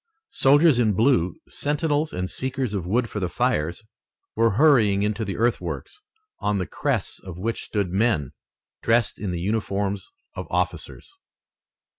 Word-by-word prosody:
Soldiers 145 0 +5
in 110 -3 +3
blue, 95 - +2
sentinels 150 +1 -1
and 90 +1 -3
seekers 130 0 -3
of 95 -4 -3
wood 115 +5 +1
for 105 - -5
the 90 -3 -1
fires, 80 +7 -1 0.5
were 115 -1 +3
hurrying 115 -10 +5
into 105 +1 -1
the 100 -2 -4
earthworks, 120 - -2 0.4
on 105 0 0
the 90 - -1
crests - - -2
of 90 -3 -9
which 115 +5 -2
stood 100 -5 -2
men, 100 - +1 0.5
dressed 115 0 +2
in 105 - -3
the 90 -1 -2
uniforms 100 0 -1 0.2
of - - -6
officers. - - -3
105 Hz, 145 wpm, -24 LUFS, 95-125 Hz, 0.5 s, Soldiers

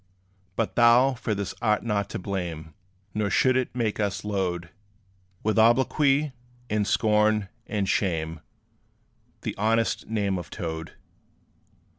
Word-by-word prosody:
But 115 - -1
thou 120 +3 +6
for 115 -3 -2
this 100 -2 -3
art 105 -3 +2
not 105 -3 -1
to - - -4
blame; 85 -5 -4 0.4
Nor 105 -1 0
should 130 +5 +3
it 130 -1 -1
make 115 -4 -1
us 100 -1 -1
load 90 -4 -2 0.7
With 110 +1 +2
obloquy, 135 +5 +3 0.4
and 105 -1 +1
scorn, 105 -2 +2 0.2
and 100 -3 -1
shame 80 -5 0 1.0
The - - -3
honest 115 +2 +1
name 100 -4 0
of 90 - -8
TOAD. 80 -1 -5
105 Hz, 125 wpm, -26 LUFS, 95-115 Hz, 1.0 s, thou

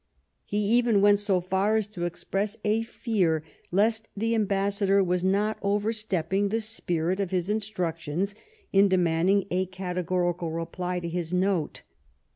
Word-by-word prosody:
lie 205 - 0
even 225 +1 +3
went 205 0 +5
so 205 -3 +1
far 190 +4 +1
as 220 -2 +2
to 190 -4 -5
express 200 +5 -2
a 215 +2 +2
tear 190 -9 0 0.3
lest 220 +4 +1
the 225 +3 0
ambassador 200 -2 +2
was 180 -1 0
not 205 +3 +1
overstepping 205 -2 0
the 225 +3 0
spirit 185 -5 -1
of" 195 -3 -1
his 185 +1 -1
instructions 185 -4 -2 0.4
in 200 +1 +6
demanding 185 +1 +2
a 185 +1 0
categorical 180 -2 -2
reply 180 +2 -3
to 170 - -5
his 170 0 -2
note. 185 -4 0
195 Hz, 140 wpm, -27 LUFS, 180-210 Hz, 0.4 s, in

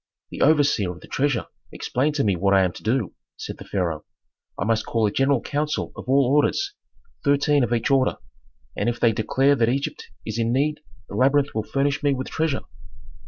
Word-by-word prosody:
"The - - -6
overseer 145 - +3
of 90 - -11
the - - -13
treasure 140 -3 0 0.3
explained 145 +4 -1
to 140 - +1
me 100 -3 +2
what 100 +3 +2
I 95 - +5
am 90 - +1
to - - -12
do," 115 -2 -1 0.2
said - - -7
the - - -9
pharaoh. 85 -6 -2 0.6
"I - - 0
must 110 0 +1
call 115 -2 0
a 105 - +1
general 135 +1 +2
council 150 +1 -2
of - - -9
all 135 0 +4
orders, 150 - +1 0.5
thirteen 145 -1 +3
of 120 - -1
each 120 +2 0
order. 135 -1 +2 0.6
And - - 0
if 120 0 -3
they 115 - +4
declare 130 +6 +2
that 115 -3 +2
Egypt 135 +3 -3 0.2
is 110 +1 -4
in 115 0 +1
need 145 +4 +1 0.3
the - - -11
labyrinth 140 +2 +2
will 110 - 0
furnish 140 +6 -1
me 145 -2 +2
with 130 0 -5
treasure." 160 -4 0
130 Hz, 205 wpm, -23 LUFS, 110-145 Hz, 0.6 s, I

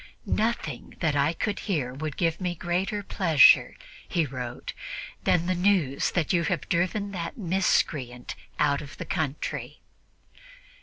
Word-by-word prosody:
"Nothing 215 - -1
that 150 -3 +1
I 145 +2 +3
could 205 +5 -2
hear 145 -10 0
of 135 - -10
would 155 -3 -3
give 165 0 0
me 180 -1 -1
greater 185 +5 -1
pleasure," 165 -7 +5 0.3
he 165 -2 +1
wrote, 125 -3 -6 0.5
"than 170 -1 +3
the 185 - +1
news 180 -7 +2
that 175 0 +1
you 170 - +3
have 180 - -1
driven 185 +4 0
that 170 -4 -5
miscreant 155 - 0 0.2
out 145 -1 +2
of 140 -3 -10
the - - -5
country." 155 -5 -3
165 Hz, 145 wpm, -27 LUFS, 145-185 Hz, 0.5 s, pleasure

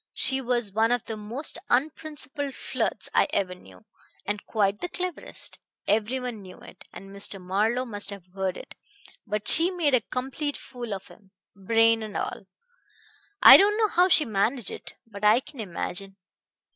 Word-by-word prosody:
She 265 0 +6
was 240 -4 -1
one 220 +3 +2
of 245 -2 0
the 225 - -5
most 230 +11 -4
unprincipled 285 +1 0
flirts - - -3
I - - +4
ever 195 -8 -1
knew, 180 +4 -17 0.4
and 205 0 -3
quite 205 -2 0
the 355 - -4
cleverest. 365 -1 -6 0.3
Everyone 225 +2 -1
knew 185 -1 -12
it, - - -15
and 195 0 -11
Mr. 200 0 -2
Marlowe 210 +7 0
must 205 -4 -6
have 200 -3 -7
heard 190 -1 -2
it; - - -11 0.5
but 210 0 -3
she 330 +3 +7
made 340 -7 0
a 255 - +4
complete 270 +6 -4
fool 240 -5 -7
of 190 - -11
him, 195 -3 -19 0.3
brain 225 +3 +3
and 215 -2 -5
all.... 195 - -5 1.0
I - - +12
don't 415 +2 +3
know 440 -1 +2
how 360 0 +4
she 310 -3 +4
managed 220 +2 0
it, - - -8
but 210 -2 -12
I 210 +3 +6
can 270 0 -13
imagine.... 195 0 -5
225 Hz, 170 wpm, -26 LUFS, 200-265 Hz, 1.0 s, I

